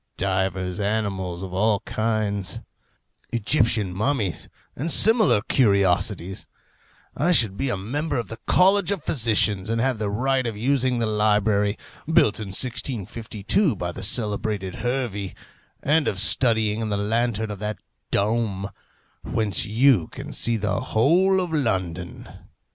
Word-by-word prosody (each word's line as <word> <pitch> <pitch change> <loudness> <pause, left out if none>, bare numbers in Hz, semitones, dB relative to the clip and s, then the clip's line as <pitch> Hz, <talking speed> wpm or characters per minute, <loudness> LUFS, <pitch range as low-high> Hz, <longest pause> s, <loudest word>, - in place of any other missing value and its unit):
divers 95 0 -1
animals 100 -4 -2
of 95 -1 -7
all 105 +2 +2
kinds; 110 -4 -2 0.7
Egyptian 115 -4 +1
mummies, 110 -2 -2 0.3
and 160 +6 -2
similar 220 - +5
curiosities; 100 -4 +1 0.7
I 165 +6 +1
should 110 - +4
be 135 +5 -2
a 120 - -1
member 145 +10 -3
of 120 - -3
the 115 - -8
College 190 0 +4
of 200 -6 -2
Physicians, 110 - +2
and 115 0 0
have 130 -1 0
the 105 -2 -2
right 130 +4 0
of 110 -3 -5
using 130 +1 +1
the 115 - 0
library, 105 -1 +1 0.3
built 160 -12 +3
in 105 - -5
1652 115 - -1
by 90 -2 -4
the - - -8
celebrated 105 -3 0
Hervey, 120 -6 -3 0.5
and 150 +2 +2
of 95 - -1
studying 110 +1 +2
in 110 - -3
the 100 - -1
lantern 110 +1 -1
of 100 - -7
that 105 +1 -4 0.3
dome, 100 -2 -1 0.5
whence 110 +2 -1
you 115 - +3
can - - -9
see 115 -1 +2
the 105 -1 -1
whole 180 +12 +2
of 180 -3 -3
London. 95 - -2
110 Hz, 135 wpm, -23 LUFS, 100-125 Hz, 0.7 s, similar